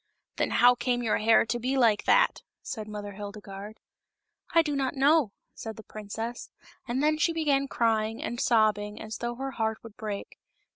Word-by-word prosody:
" - - -56
Then - - +1
how 245 +1 +6
came 245 0 -1
your 225 - +1
hair 225 +1 +5
to 240 +2 -2
be 260 +3 -1
like 225 -5 +3
that?" - - +4 0.2
said 215 -3 -5
Mother 205 -1 -6
Hildegarde. 205 +1 -8 0.4
" - - -27
I 330 - +7
do 295 -2 -2
not 270 -1 -1
know," 280 -3 +4 0.2
said 220 -1 -7
the 220 - -11
princess; 220 +3 -6 0.4
and 255 +4 -1
then 305 0 +2
she 340 +1 +3
began 285 -4 +1
crying 225 -2 0
and 240 - -3
sob 215 -2 +4
bing 210 +1 -7
as 220 0 -6
though 240 0 -3
her 270 +2 -4
heart 220 -3 -1
would 225 -2 -11
break. 210 -3 -6
230 Hz, 195 wpm, -28 LUFS, 215-265 Hz, 0.4 s, I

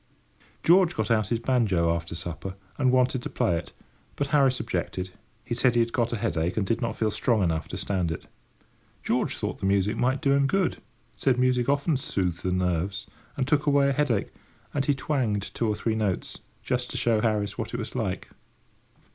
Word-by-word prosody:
George 175 0 +5
got 110 0 -1
out 110 -3 +3
his 115 - 0
banjo 105 -9 +2
after 85 0 -5
supper, 90 +3 -5 0.2
and 130 -2 +4
wanted 130 0 +2
to - - -5
play 85 - +1
it, 85 - -5 0.4
but 140 -1 -2
Harris 135 -4 +3
objected: 95 -3 -3 0.3
he - - -3
said 120 0 +2
he - - +4
had 115 0 +1
got 120 -2 +1
a - - 0
headache, 85 -3 -1
and 105 - +1
did 115 +5 0
not 115 -2 -1
feel 110 -1 0
strong 110 -1 +1
enough 80 -2 0
to 90 - -6
stand 95 -3 -1
it. 80 - -5 0.8
George - - 0
thought - - -3
the 95 - -1
music 100 +1 +2
might 130 +2 +1
do 140 0 +2
him 140 0 +3
good—said 150 -6 -1
music 125 0 +2
often 140 +3 +2
soothed 95 - -1
the 90 - -1
nerves 90 +2 -1 0.3
and 130 -2 0
took 150 0 +2
away 140 -1 +4
a - - +1
headache; 130 -8 0 0.4
and 140 -1 0
he 145 - +2
twanged 120 -9 -1
two 115 - 0
or 105 - +1
three 110 +1 -1
notes, 105 -5 -2 0.2
just 125 0 -1
to - - -4
show 115 -2 +2
Harris 105 -2 0
what 115 - -3
it 120 - -3
was 115 -2 -5
like. 105 -7 -3
115 Hz, 200 wpm, -26 LUFS, 95-130 Hz, 0.8 s, George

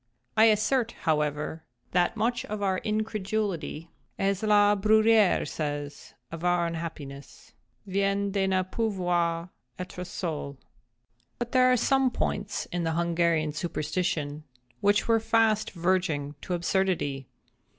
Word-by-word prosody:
I 220 - +6
assert, 225 +3 +2
however, 150 0 0 0.3
that 180 +5 +1
much 240 +3 0
of 210 -1 -4
our 190 -2 +1
incredulity—as 200 -3 -3
La 210 -1 +4
Bruyère 215 0 +4
says 145 -2 -5 0.2
of 165 0 -7
all 180 - +3
our - - +1
unhappiness—"vient 170 +5 -4
de 195 -1 +1
ne 185 -1 +2
pouvoir 180 -4 -1 0.3
être 180 0 -6
seuls." 160 -6 -4
{*1} - - -28 0.8
But 240 0 -4
there 255 0 +5
are 250 - +4
some 270 +2 +3
points - - -2
in 175 -1 -2
the 165 0 0
Hungarian 170 -2 +1
superstition 155 -2 -2 0.4
which 205 0 +2
were 230 -1 +4
fast 220 -1 +2
verging 170 -5 0
to 180 - -2
absurdity. 170 -7 -1
185 Hz, 120 wpm, -27 LUFS, 165-215 Hz, 0.8 s, I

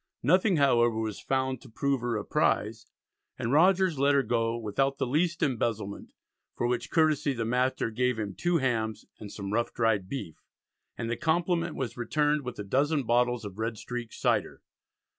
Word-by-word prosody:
Nothing 185 - +4
however 120 -5 +3
was 110 -2 -3
found 130 -1 -1
to - - -14
prove 140 +2 -1
her 120 -2 -1
a 105 - -5
prize, - - 0 0.5
and 120 -2 -2
Rogers 180 +1 +4
let 140 +1 +4
her 140 - +3
go 115 0 0
"without 135 +5 -1
the - - 0
least 165 +6 0
embezzlement," 110 -6 -2 0.4
for - - -1
which 120 0 -1
courtesy 155 -3 +2
the 115 -3 -3
master 125 0 0
gave 125 +1 0
him 105 -3 -3
"two 175 - +1
hams, 110 -6 -1
and 105 -2 -8
some 100 -1 -5
ruff 115 +1 0
dryed 105 -5 +1
beef," 105 - -5 0.6
and 115 - -3
the 120 0 -2
compliment 170 +1 0
was 125 -3 -4
returned 150 +5 +1
with 125 -3 -7
"a 105 - -4
dozen 140 +7 +1
bottles 120 -1 +1
of 100 +1 -8
red 115 0 -2
streak 120 +1 -6
Cyder." - - -1
125 Hz, 180 wpm, -28 LUFS, 115-140 Hz, 0.6 s, Nothing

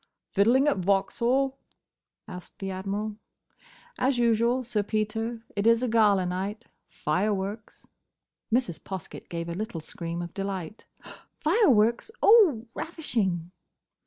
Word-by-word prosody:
"Fiddling 240 +8 +4
at 290 - +2
Vauxhall?" 235 +8 +1 0.7
asked 180 0 -10
the 195 -1 -4
Admiral. 205 +3 -3 0.8
"As 260 0 +2
usual, 235 +2 +2
Sir 230 -3 0
Peter. 220 +2 -2
It 205 +2 +1
is 230 +1 +4
a - - +1
gala 210 -5 +4
night. 195 +5 -3 0.2
Fireworks." 200 +5 -2 0.7
Mrs. 220 - 0
Poskett 190 -4 -8
gave 170 0 -4
a 170 - -3
little 210 -1 -4
scream 170 +2 -5
of 170 - -8
delight. 195 0 -5 0.5
"Fireworks! 280 - +3
Oh, 370 - +6
ravishing!" 195 - -2
215 Hz, 115 wpm, -27 LUFS, 190-240 Hz, 0.8 s, Oh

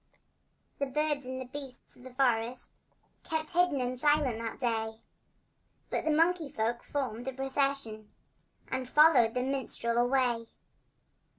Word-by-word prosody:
The 280 - 0
birds 295 0 -1
and 260 0 -4
the 260 - -5
beasts 265 0 -9
of - - -18
the 260 - -9
forest 245 -2 0 0.5
Kept 315 -1 -2
hidden 350 -5 +3
and 250 0 -2
silent 290 -5 +2
that 230 -1 -4
day, 225 -3 -1 0.9
But - - -1
the 315 - +2
monkey 330 0 +3
folk 230 0 -1
formed 250 -4 -3
a 265 - -2
procession 270 -5 -1 0.6
And 260 -1 -3
followed 265 -7 +6
the 250 - +1
minstrel 255 -3 -1
away. 245 -2 +2
260 Hz, 135 wpm, -30 LUFS, 240-285 Hz, 0.9 s, followed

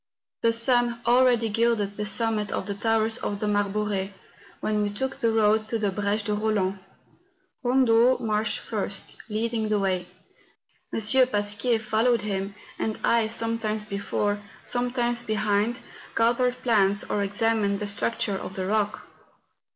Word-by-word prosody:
The 230 - +4
sun 240 0 +2
already 240 -1 +4
gilded 220 -2 +1
the 210 0 -3
summit 220 -2 0
of - - -2
the 200 - -3
towers 225 +2 +1
of 205 - -3
the 215 - -2
Marbore, 205 -1 0 0.5
when 210 -1 0
we 205 - 0
took 265 +6 -3
the 230 - +1
road 220 0 +2
to 230 - 0
the 210 -3 0
Breche 205 +2 -1
de 210 - -2
Eoland. 205 -3 0 0.8
Eondo 245 -1 +4
marched 215 -1 0
first, 200 -3 -3
leading 220 0 -1
the 210 - +2
way. 185 -3 -1 0.8
M. - - -2 0.3
Pasquier 210 +2 0
followed 225 +2 +1
him, 195 -1 -3 0.2
and 220 - -1
I, 230 -1 +3
sometimes 225 -1 -2
before, 205 0 -2 0.2
sometimes 245 -1 0
behind, 215 +1 0 0.3
gathered 245 +2 +2
plants 205 -4 +3
or 205 - -1
examined 205 0 +1
the 210 - -3
structure 205 +1 -1
of 190 - -6
the 190 -2 -2
rock. 210 +1 0
215 Hz, 145 wpm, -26 LUFS, 205-230 Hz, 0.8 s, The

